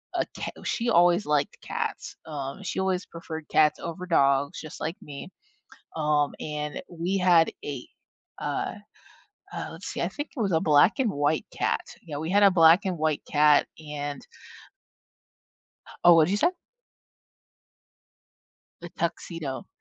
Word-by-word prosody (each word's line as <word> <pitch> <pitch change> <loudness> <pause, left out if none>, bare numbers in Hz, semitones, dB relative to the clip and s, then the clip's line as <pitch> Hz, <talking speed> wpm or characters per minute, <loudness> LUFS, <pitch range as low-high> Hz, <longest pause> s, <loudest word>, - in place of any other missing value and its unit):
a - - +1
ca - - -4
oh, - - -13
she 235 +1 -1
always 175 +2 +4
liked 150 -1 0
cats. - - -4
Um, 140 +3 -5
she - - -3
always 190 0 0
preferred 160 -2 -8
cats 150 -1 +3
over 175 +2 -6
dogs 140 -4 +2
just 155 - -9
like 160 +2 -2
me, 145 +4 -9 0.7
um, 150 -2 +1
and 150 -1 -4
we 175 +3 -2
had 175 -3 +4
a 140 -4 -5 0.5
uh, 390 0 -2 0.8
uh, - - -4
let's - - -10
see, - - -5
I - - 0
think 290 +1 -6
it - - -4
was 195 -5 +1
a 160 - +3
black 150 +4 +5
and 250 -6 +2
white 145 +1 0
cat. - - 0 0.3
Yeah, 150 -3 -5
we 160 +3 -4
had 205 +1 +4
a 200 - +8
black 170 +2 +6
and 185 - -1
white 155 -1 0
cat 150 0 +5 0.2
and 145 -2 -5 1.8
Oh, 175 0 +9
what 165 -1 +6
did 180 - -2
you 205 - +2
say? 335 - +3 2.3
The 175 - -7
tuxedo. 165 -5 -4
160 Hz, 155 wpm, -26 LUFS, 150-180 Hz, 2.3 s, Oh